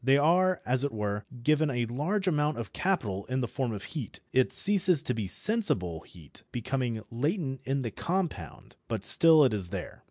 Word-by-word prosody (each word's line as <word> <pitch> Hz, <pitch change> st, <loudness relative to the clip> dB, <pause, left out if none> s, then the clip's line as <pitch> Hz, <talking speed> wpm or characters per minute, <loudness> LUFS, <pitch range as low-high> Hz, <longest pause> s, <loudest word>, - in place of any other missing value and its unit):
They 135 Hz, +2 st, +4 dB
are, 180 Hz, +5 st, +2 dB
as 130 Hz, +2 st, +1 dB
it 145 Hz, -, -1 dB
were, 105 Hz, -1 st, -4 dB, 0.2 s
given 155 Hz, +2 st, +2 dB
a 120 Hz, -3 st, -1 dB
large 165 Hz, -, -2 dB
amount 150 Hz, -4 st, 0 dB
of 115 Hz, -4 st, -7 dB
capital 105 Hz, -, -2 dB
in 130 Hz, +1 st, -2 dB
the 120 Hz, -, -2 dB
form 130 Hz, -2 st, -3 dB
of 100 Hz, -3 st, -6 dB
heat. 140 Hz, -9 st, -7 dB
It 130 Hz, 0 st, +2 dB
ceases 190 Hz, -6 st, +5 dB
to 125 Hz, -, -2 dB
be 110 Hz, -4 st, -4 dB
sensible 95 Hz, -, +1 dB
heat, 80 Hz, -3 st, -14 dB
becoming 120 Hz, -2 st, -3 dB
latent 135 Hz, -, -3 dB
in 135 Hz, 0 st, -2 dB
the 115 Hz, -, -4 dB
compound, 180 Hz, -, -5 dB
but 110 Hz, -4 st, -4 dB
still 160 Hz, -2 st, +7 dB
it 130 Hz, -5 st, +2 dB
is 95 Hz, -4 st, -3 dB
there. -, -, -7 dB
130 Hz, 190 wpm, -28 LUFS, 110-160 Hz, 0.2 s, still